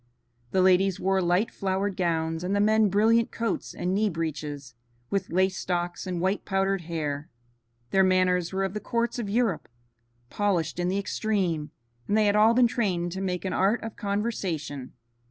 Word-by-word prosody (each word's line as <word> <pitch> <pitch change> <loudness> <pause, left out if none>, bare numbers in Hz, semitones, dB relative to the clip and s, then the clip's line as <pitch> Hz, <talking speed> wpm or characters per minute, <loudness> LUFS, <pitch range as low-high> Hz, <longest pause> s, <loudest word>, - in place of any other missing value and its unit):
The 185 +5 +2
ladies 190 0 +3
wore 190 0 +1
light 180 +5 +1
flowered 195 0 -1
gowns, 165 -2 -1
and 190 +3 0
the - - +2
men 215 0 +4
brilliant 225 +4 +3
coats 230 0 -3
and 180 +1 -1
knee 210 +2 +2
breeches, 150 -5 -4 0.4
with 195 -2 -1
lace 190 +2 +1
stocks 175 +1 -2
and 180 -2 -2
white 190 +3 0
powdered 195 -1 0
hair. 155 -2 -4 0.6
Their 195 0 +4
manners 185 -2 +2
were 195 0 -1
of 195 -1 -2
the 210 - -3
courts 235 +2 -1
of 215 -4 -3
Europe, 220 -5 0 0.6
polished 180 -6 0
in 175 - 0
the 190 +2 0
extreme, 190 -7 -1 0.4
and 210 - +2
they 215 - +4
had 205 0 +3
all 220 +2 +5
been 250 0 +6
trained 185 -7 0
to 190 +2 -4
make 180 -1 -2
an 190 - -1
art 200 +5 +2
of 225 -1 -6
conversation. 190 - -3
190 Hz, 175 wpm, -27 LUFS, 175-205 Hz, 0.6 s, been